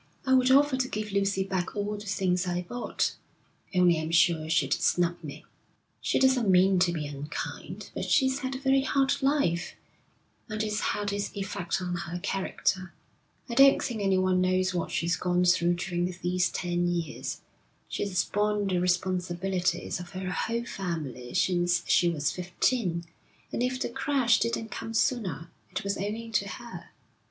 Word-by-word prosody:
'I 260 Hz, -, +3 dB
would 255 Hz, 0 st, +5 dB
offer 275 Hz, 0 st, +5 dB
to 260 Hz, -1 st, 0 dB
give 215 Hz, -3 st, -4 dB
Lucy 195 Hz, -1 st, +1 dB
back 190 Hz, -1 st, -3 dB
all 205 Hz, 0 st, -2 dB
the 205 Hz, 0 st, -8 dB
things 185 Hz, -2 st, 0 dB
I 180 Hz, 0 st, -1 dB
bought, 245 Hz, +7 st, -2 dB, 0.6 s
only 175 Hz, -3 st, +4 dB
I'm 160 Hz, 0 st, -3 dB
sure 165 Hz, -1 st, +3 dB
she'd 150 Hz, -4 st, +2 dB
snub 175 Hz, -1 st, +1 dB
me.' 145 Hz, -3 st, -8 dB, 0.6 s
'She -, -, +1 dB
doesn't 260 Hz, -5 st, +3 dB
mean 185 Hz, 0 st, +5 dB
to 180 Hz, -1 st, +3 dB
be 160 Hz, -3 st, -3 dB
unkind, 145 Hz, +1 st, -6 dB
but -, -, -3 dB
she's 265 Hz, -1 st, +2 dB
had 265 Hz, -1 st, -3 dB
a -, -, -4 dB
very 270 Hz, 0 st, +3 dB
hard 275 Hz, +1 st, +1 dB
life, 265 Hz, -, +1 dB, 0.7 s
and 215 Hz, 0 st, -2 dB
it's 210 Hz, -1 st, -1 dB
had 205 Hz, -1 st, -1 dB
its 200 Hz, 0 st, -2 dB
effect 195 Hz, -2 st, -2 dB
on 180 Hz, -1 st, -3 dB
her 170 Hz, +1 st, -5 dB
character. 185 Hz, -1 st, -2 dB, 0.5 s
I 240 Hz, -, -5 dB
don't 275 Hz, +3 st, +7 dB
think 230 Hz, -4 st, -3 dB
anyone 185 Hz, -1 st, +2 dB
knows 185 Hz, 0 st, +1 dB
what 175 Hz, -2 st, -2 dB
she's 170 Hz, +1 st, 0 dB
gone 180 Hz, 0 st, +1 dB
through 175 Hz, -1 st, +3 dB
during 175 Hz, 0 st, -2 dB
these 180 Hz, 0 st, +1 dB
ten 175 Hz, 0 st, -1 dB
years. 170 Hz, -4 st, -3 dB, 0.5 s
She's 190 Hz, -3 st, -1 dB
borne 210 Hz, 0 st, 0 dB
the 185 Hz, -2 st, +1 dB
responsibilities 180 Hz, 0 st, -1 dB
of 175 Hz, +1 st, -9 dB
her 185 Hz, -1 st, -4 dB
whole 230 Hz, +7 st, -2 dB
family 150 Hz, -, -5 dB
since 175 Hz, -1 st, +2 dB
she 175 Hz, -, +4 dB
was 150 Hz, -4 st, 0 dB
fifteen, 180 Hz, 0 st, -1 dB, 0.5 s
and -, -, -2 dB
if 255 Hz, +1 st, 0 dB
the -, -, -1 dB
crash 265 Hz, -1 st, +2 dB
didn't 230 Hz, -1 st, -1 dB
come 225 Hz, -, -5 dB
sooner, 210 Hz, -, 0 dB, 0.2 s
it -, -, -3 dB
was 200 Hz, 0 st, -1 dB
owing 220 Hz, +4 st, -4 dB
to 200 Hz, -2 st, 0 dB
her. 235 Hz, +4 st, -9 dB
185 Hz, 165 wpm, -28 LUFS, 175-220 Hz, 0.7 s, don't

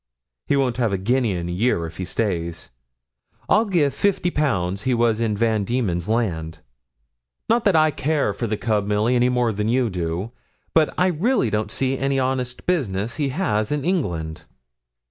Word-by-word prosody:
He 140 Hz, -, +2 dB
won't 125 Hz, -4 st, +1 dB
have 115 Hz, -4 st, +1 dB
a 100 Hz, -, 0 dB
guinea 115 Hz, +3 st, +1 dB
in 85 Hz, -1 st, -3 dB
a -, -, -3 dB
year 90 Hz, -2 st, +1 dB
if 80 Hz, -, -9 dB
he 95 Hz, -, -3 dB
stays 85 Hz, -, -3 dB, 0.8 s
here. -, -, +6 dB
I'd 220 Hz, -1 st, -1 dB
give 155 Hz, -7 st, +2 dB
fifty 195 Hz, -3 st, +1 dB
pounds 100 Hz, -, 0 dB
he 130 Hz, +1 st, +1 dB
was 115 Hz, -2 st, +2 dB
in 110 Hz, -3 st, 0 dB
Van 110 Hz, -2 st, +1 dB
Diemen's 100 Hz, -6 st, -1 dB
Land 85 Hz, -9 st, -1 dB, 0.9 s
not 230 Hz, 0 st, +2 dB
that 200 Hz, -4 st, +4 dB
I 155 Hz, -1 st, +5 dB
care 145 Hz, -6 st, 0 dB
for 115 Hz, +4 st, -3 dB
the 105 Hz, 0 st, -1 dB
cub, 105 Hz, -3 st, 0 dB
Milly, 105 Hz, +4 st, +2 dB
any 125 Hz, 0 st, +3 dB
more 125 Hz, -2 st, +1 dB
than 105 Hz, +2 st, -1 dB
you 120 Hz, -2 st, +1 dB
do; 90 Hz, +4 st, -3 dB, 0.4 s
but 160 Hz, -2 st, +4 dB
I 180 Hz, -, +3 dB
really 185 Hz, -, +1 dB
don't 105 Hz, +1 st, -1 dB
see 135 Hz, 0 st, -1 dB
any 135 Hz, 0 st, 0 dB
honest 130 Hz, -1 st, -2 dB
business 115 Hz, -, -1 dB
he 145 Hz, -3 st, 0 dB
has 130 Hz, -, -1 dB
in 150 Hz, -1 st, -1 dB
England.' 85 Hz, -, -2 dB
115 Hz, 185 wpm, -22 LUFS, 100-140 Hz, 0.9 s, here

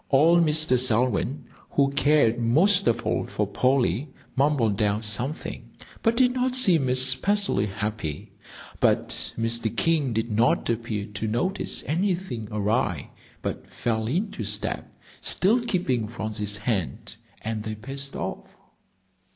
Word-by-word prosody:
Old 165 Hz, +5 st, +5 dB
Mr. 155 Hz, -5 st, +3 dB
Selwyn, 125 Hz, +2 st, +1 dB, 0.2 s
who 140 Hz, -1 st, +2 dB
cared 140 Hz, -5 st, +3 dB
most 180 Hz, -, +3 dB
of 115 Hz, +1 st, +1 dB
all -, -, 0 dB
for -, -, -1 dB
Polly, 130 Hz, -, +1 dB, 0.2 s
mumbled 130 Hz, -8 st, +2 dB
out 105 Hz, +1 st, +1 dB
something, 120 Hz, +8 st, -2 dB, 0.3 s
but 230 Hz, 0 st, +1 dB
did 250 Hz, -1 st, +4 dB
not 255 Hz, 0 st, 0 dB
seem 175 Hz, -, +4 dB
especially 130 Hz, -, +2 dB
happy. 105 Hz, -6 st, -4 dB, 0.5 s
But -, -, +2 dB, 0.3 s
Mr. 115 Hz, 0 st, 0 dB
King 155 Hz, -6 st, +2 dB
did 115 Hz, +1 st, -2 dB
not 115 Hz, +3 st, +2 dB
appear 115 Hz, -3 st, -3 dB
to 105 Hz, +1 st, -5 dB
notice 155 Hz, -, 0 dB
anything 175 Hz, -, -2 dB
awry, 105 Hz, -, -1 dB, 0.3 s
but -, -, -5 dB
fell 110 Hz, -2 st, -2 dB
into 175 Hz, -, -2 dB
step, 105 Hz, 0 st, -2 dB, 0.3 s
still 230 Hz, +6 st, +2 dB
keeping 140 Hz, -, -1 dB
Phronsie's 105 Hz, -2 st, -2 dB
hand, 105 Hz, -5 st, -3 dB, 0.3 s
and 110 Hz, -1 st, -3 dB
they 110 Hz, 0 st, -5 dB
paced 135 Hz, +5 st, -6 dB
off. -, -, -5 dB
125 Hz, 125 wpm, -25 LUFS, 110-155 Hz, 0.5 s, Old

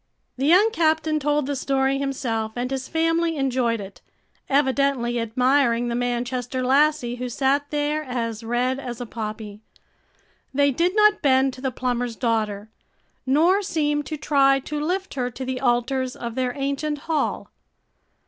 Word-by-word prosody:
The 270 Hz, +2 st, -1 dB
young 385 Hz, +7 st, +5 dB
captain 315 Hz, -4 st, +1 dB
told 295 Hz, 0 st, +1 dB
the 285 Hz, +1 st, -2 dB
story 270 Hz, 0 st, 0 dB
himself 240 Hz, -6 st, -2 dB
and 250 Hz, +1 st, -3 dB
his 265 Hz, -1 st, -3 dB
family 330 Hz, 0 st, +1 dB
enjoyed 255 Hz, -4 st, 0 dB
it, 195 Hz, -1 st, -10 dB, 0.5 s
evidently 270 Hz, -3 st, +1 dB
admiring 240 Hz, +1 st, +2 dB
the 235 Hz, -, -2 dB
Manchester 245 Hz, +1 st, -2 dB
lassie, 270 Hz, -2 st, +2 dB
who 250 Hz, 0 st, -4 dB
sat 280 Hz, +3 st, 0 dB
there 295 Hz, +1 st, -1 dB
as 230 Hz, -4 st, -4 dB
red 245 Hz, +3 st, 0 dB
as 245 Hz, -3 st, -6 dB
a 245 Hz, -, -4 dB
poppy. 215 Hz, -2 st, -6 dB, 0.9 s
They 285 Hz, 0 st, +4 dB
did 345 Hz, +8 st, 0 dB
not 425 Hz, -1 st, +4 dB
bend 265 Hz, -1 st, +3 dB
to 255 Hz, -, -11 dB
the 265 Hz, -, 0 dB
plumber's 245 Hz, -1 st, -2 dB
daughter, 220 Hz, -3 st, -1 dB, 0.6 s
nor 335 Hz, +9 st, +4 dB
seem 295 Hz, -6 st, 0 dB
to 310 Hz, -, -5 dB
try 275 Hz, -1 st, +3 dB
to 295 Hz, +2 st, -4 dB
lift 375 Hz, +4 st, -2 dB
her 250 Hz, -2 st, -2 dB
to 260 Hz, +2 st, -7 dB
the 255 Hz, 0 st, -3 dB
altars 255 Hz, +1 st, 0 dB
of 235 Hz, -1 st, -5 dB
their 250 Hz, 0 st, -2 dB
ancient 280 Hz, +2 st, -2 dB
hall. 315 Hz, -3 st, -1 dB
265 Hz, 155 wpm, -23 LUFS, 245-295 Hz, 0.9 s, young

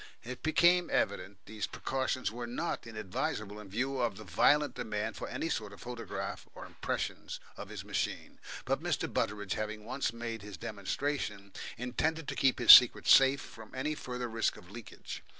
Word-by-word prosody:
It 125 Hz, +1 st, -7 dB
became 175 Hz, +3 st, +4 dB
evident 100 Hz, 0 st, -1 dB
these 105 Hz, -1 st, -4 dB
precautions 130 Hz, -2 st, -2 dB
were 120 Hz, +1 st, -5 dB
not 125 Hz, +2 st, -3 dB
inadvisable 110 Hz, -, -4 dB
in 105 Hz, -2 st, -11 dB
view 130 Hz, +6 st, -1 dB
of 115 Hz, -5 st, 0 dB
the 110 Hz, -, -8 dB
violent 145 Hz, -, +3 dB
demand 105 Hz, -1 st, -3 dB
for -, -, -5 dB
any -, -, -3 dB
sort 105 Hz, -9 st, -3 dB
of 100 Hz, -, -13 dB
photograph 120 Hz, -1 st, -6 dB
or -, -, -8 dB
impressions -, -, -4 dB, 0.2 s
of -, -, -8 dB
his -, -, -7 dB
machine. -, -, -3 dB, 0.3 s
But -, -, 0 dB
Mr. -, -, -1 dB
Butteridge, 105 Hz, -3 st, -1 dB
having 110 Hz, 0 st, -4 dB
once 130 Hz, +1 st, -1 dB
made 115 Hz, -1 st, -5 dB
his 100 Hz, -3 st, -9 dB
demonstration, 105 Hz, -, -3 dB, 0.2 s
intended 145 Hz, +6 st, -1 dB
to -, -, -4 dB
keep 135 Hz, -1 st, +3 dB
his 120 Hz, -, +9 dB
secret 125 Hz, -2 st, +9 dB
safe 135 Hz, +1 st, +7 dB
from 110 Hz, +1 st, -12 dB
any 145 Hz, +4 st, -1 dB
further 125 Hz, -4 st, -5 dB
risk 115 Hz, -1 st, 0 dB
of 90 Hz, -, -14 dB
leakage. 110 Hz, -1 st, -8 dB
115 Hz, 170 wpm, -32 LUFS, 105-130 Hz, 0.3 s, his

